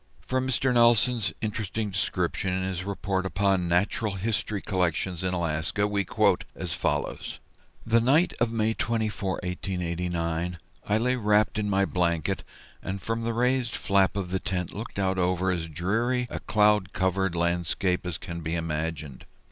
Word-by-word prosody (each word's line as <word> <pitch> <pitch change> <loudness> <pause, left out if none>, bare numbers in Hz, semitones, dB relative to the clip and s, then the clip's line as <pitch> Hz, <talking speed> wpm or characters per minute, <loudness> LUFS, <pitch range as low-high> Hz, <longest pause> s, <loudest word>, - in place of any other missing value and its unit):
From 130 0 -1
Mr. 130 0 +1
Nelson's 120 -1 +4
interesting 110 -1 -2
description, 95 -1 -1
in 95 0 -1
his 95 -1 -2
report 100 -1 -1
upon 95 -1 +1
"Natural 100 +4 +1
History 105 +1 -1
Collections 90 -1 -1
in 95 - 0
Alaska," 80 +3 0
we 100 -1 0
quote - - +2
as - - -3
follows: - - -2 0.5
"The 115 +1 +4
night 150 +9 +4
of 115 -1 +2
May 110 -1 +1
24, 110 -4 -1
1889, 90 -1 -2 0.3
I 105 - +4
lay 125 +3 +1
wrapped 105 -1 +2
in 105 -1 -1
my 100 0 +3
blanket, 85 -4 0 0.4
and 95 +1 -4
from 115 +3 -2
the 115 0 -1
raised 125 -1 +1
flap 100 -1 +2
of 90 -3 -3
the 95 - 0
tent 90 -3 -3
looked 110 +1 -7
out 95 -1 +1
over 90 +1 +1
as 85 -2 -2
dreary 115 - 0
a - - -3
cloud 105 -3 +3
covered 95 -1 +1
landscape 85 +2 0
as 90 -3 -3
can 85 +1 -6
be 80 +1 -2
imagined. 80 -4 -3
95 Hz, 155 wpm, -27 LUFS, 90-110 Hz, 0.5 s, Nelson's